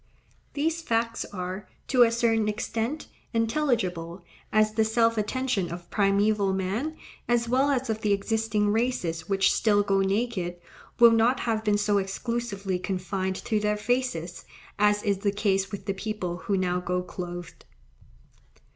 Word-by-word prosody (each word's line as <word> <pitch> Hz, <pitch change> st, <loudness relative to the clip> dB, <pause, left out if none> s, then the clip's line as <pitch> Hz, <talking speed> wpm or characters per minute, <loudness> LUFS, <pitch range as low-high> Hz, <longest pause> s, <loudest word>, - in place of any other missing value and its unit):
These 320 Hz, +3 st, 0 dB
facts 230 Hz, -5 st, -1 dB
are, 185 Hz, +1 st, -6 dB, 0.2 s
to 255 Hz, -2 st, +4 dB
a 235 Hz, -, +8 dB
certain 225 Hz, -2 st, +2 dB
extent, 225 Hz, +7 st, -2 dB, 0.3 s
intelligible, 220 Hz, -, 0 dB, 0.3 s
as 215 Hz, 0 st, +3 dB
the 220 Hz, 0 st, +3 dB
self 230 Hz, +1 st, +2 dB
attention 215 Hz, -4 st, -1 dB
of 170 Hz, 0 st, -8 dB
primeval 200 Hz, 0 st, +2 dB
man, 205 Hz, +12 st, -2 dB, 0.3 s
as 240 Hz, -1 st, +2 dB
well 260 Hz, +4 st, +2 dB
as 265 Hz, -2 st, 0 dB
of 220 Hz, -1 st, -2 dB
the 210 Hz, -, +1 dB
existing 210 Hz, +1 st, +1 dB
races 190 Hz, -8 st, -1 dB
which 195 Hz, -1 st, +3 dB
still 205 Hz, -2 st, +3 dB
go 195 Hz, -1 st, +2 dB
naked, 195 Hz, -3 st, 0 dB, 0.4 s
will 235 Hz, -1 st, +8 dB
not 230 Hz, +3 st, +3 dB
have 220 Hz, -2 st, -1 dB
been 210 Hz, -1 st, +2 dB
so 205 Hz, 0 st, +2 dB
exclusively 200 Hz, -1 st, -3 dB
confined 190 Hz, 0 st, -2 dB
to 220 Hz, -3 st, +1 dB
their 210 Hz, 0 st, 0 dB
faces, 210 Hz, -7 st, -2 dB, 0.4 s
as 210 Hz, 0 st, +3 dB
is 200 Hz, -2 st, +1 dB
the 200 Hz, 0 st, +1 dB
case 195 Hz, -1 st, 0 dB
with 200 Hz, -, -6 dB
the 195 Hz, -, -1 dB
people 195 Hz, -3 st, -4 dB
who 195 Hz, +2 st, -1 dB
now 180 Hz, -1 st, 0 dB
go 180 Hz, 0 st, -2 dB
clothed. 175 Hz, -1 st, -7 dB
210 Hz, 150 wpm, -27 LUFS, 190-230 Hz, 0.4 s, a